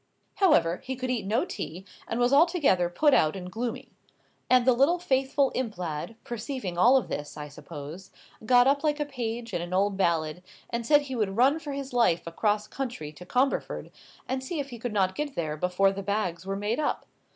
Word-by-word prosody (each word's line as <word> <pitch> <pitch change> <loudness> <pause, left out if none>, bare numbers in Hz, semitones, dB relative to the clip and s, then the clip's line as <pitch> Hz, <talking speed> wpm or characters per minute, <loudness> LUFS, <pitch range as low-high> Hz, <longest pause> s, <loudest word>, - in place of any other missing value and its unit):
However, 180 - +4
he 265 - -4
could 255 0 -3
eat 230 -6 -2
no 225 - +1
tea, 190 - -6 0.2
and 230 - -2
was 245 +2 +3
altogether 285 - +4
put 290 - +3
out 155 -6 +3
and 180 -1 -7
gloomy. 235 +2 -4 0.6
And 255 -1 +5
the 255 - +6
little 275 +8 +3
faithful 270 -4 +1
imp 230 -6 -3
lad, 170 +4 -4
perceiving 235 -5 -5
all 245 +9 +6
this, 145 0 -6
I 150 0 -6
suppose, 150 +5 -9 0.3
got 245 +2 +5
up 280 +2 +2
like 300 -1 +1
a 295 - 0
page 235 -4 -5
in - - -1
an 175 +1 -4
old 195 +1 +1
ballad, 165 -3 0 0.3
and 235 -1 -3
said 295 -1 +6
he 270 -2 -6
would 205 -3 -1
run 275 +6 +4
for 290 -2 -6
his 275 -2 -5
life 230 -9 +2
across 210 +5 0
country 235 - -5
to 180 +4 -13
Comberford, 260 +6 0 0.4
and 260 +1 -2
see 310 +4 -4
if 280 -1 -4
he 240 - -8
could 245 +1 -3
not 190 -3 +1
get 295 +2 -4
there 155 -3 -2
before 180 +4 +2
the 195 0 -5
bags 190 -3 -2
were 195 - -1
made 210 +5 -1
up. 300 - -1
230 Hz, 205 wpm, -27 LUFS, 180-265 Hz, 0.6 s, the